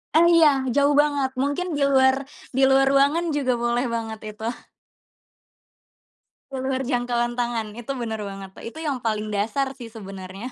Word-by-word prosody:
Oh 340 +1 +7
iya 330 -2 +7 0.3
jauh 285 0 +4
banget, 285 -3 0
mungkin 285 +6 -1
di 280 - +1
luar 265 0 +5 0.4
di 270 - +2
luar 270 0 +5
ruangan 285 +5 +3
juga 260 -3 +1
boleh 240 +2 +1
banget 225 -1 -4
itu. 215 +1 -9 2.1
Di 265 - -4
luar 265 0 -1
jangkauan 240 -1 0
tangan, 230 -3 -2
itu 270 +3 -4
bener 225 -3 -4
banget, 195 -1 -8 0.2
itu 320 +7 -8
yang 280 -4 -1
paling 215 -2 -2
dasar 250 +7 -1
sih 250 -4 -10
sebenernya. 195 +1 -8
250 Hz, 155 wpm, -24 LUFS, 220-275 Hz, 2.1 s, Oh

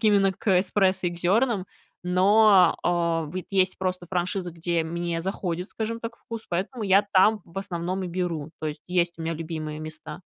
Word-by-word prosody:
к - - -6
именно 200 -2 +4
к 190 -1 +2
эспрессо 190 -2 +2
и - - -5
к 175 - -8
зёрнам. 200 +2 +2 0.4
Но, 190 +1 +5
э, 170 -2 +1
вот 185 0 -4
есть 190 -1 +2
просто 185 -1 -2
франшиза, 180 -1 -2
где 170 0 -1
мне 170 0 -2
заходит, 180 0 -3
скажем 225 +1 -3
так, 230 0 -6
вкус, 230 -1 -8
поэтому 200 +6 -2
я 195 +1 +5
там, 210 +3 +5
в 170 +3 -8
основном, 185 0 -3
и - - -3
беру. 170 -4 -3
То 155 - -1
есть 150 0 -7
есть 175 -1 0
у - - -5
меня 165 +1 -1
любимые 155 -1 -5
места. 155 +3 -8
180 Hz, 190 wpm, -25 LUFS, 170-195 Hz, 0.4 s, Но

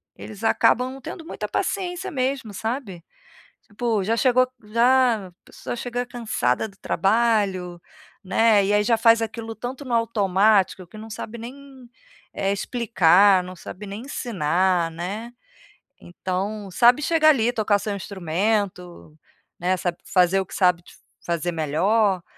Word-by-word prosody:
eles 215 0 -10
acabam 250 +3 +3
não 270 - -11
tendo 325 +5 -8
muita - - -5
paciência 375 -1 -2
mesmo, 260 - -2
sabe. 220 -5 -5 0.8
Pô, 225 -5 0
já 225 +4 0
chegou 255 0 +4 0.2
já 235 -2 +2
a - - -20
pessoa - - -7
chega 245 +1 -3
cansada 220 - -1
do 195 - -19
trabalho, 195 -6 0 0.4
né. 210 +1 +3
E 205 - +1
aí, 210 - +3
já 230 +1 +3
faz 230 0 +5
aquilo 225 0 -5
tanto 245 +5 -7
no 245 -3 -3
automático 200 -4 +2
que 215 - -13
não 220 +1 -9
sabe 220 +1 -7
nem, 260 +1 -11 0.5
eh, 195 0 0
explicar, 195 -3 +3
não 180 0 -9
sabe 195 +4 -9
nem 200 +3 -7
ensinar, 185 - 0
né. 200 +8 -6 0.7
Então, 190 +3 -4
sabe, 245 +8 +4
chegar 315 0 +3
ali, 240 -5 +2
tocar 215 -3 +1
seu 205 0 -4
instrumento, 185 -2 -3 0.4
né, 180 +2 0
sabe, 175 -2 -3
fazer 185 +1 +3
o 190 - -4
que - - -11
sabe 180 -2 +2
de - - -17 0.3
fazer 170 0 -1
melhor, 180 +5 +1
210 Hz, 145 wpm, -23 LUFS, 185-235 Hz, 0.8 s, faz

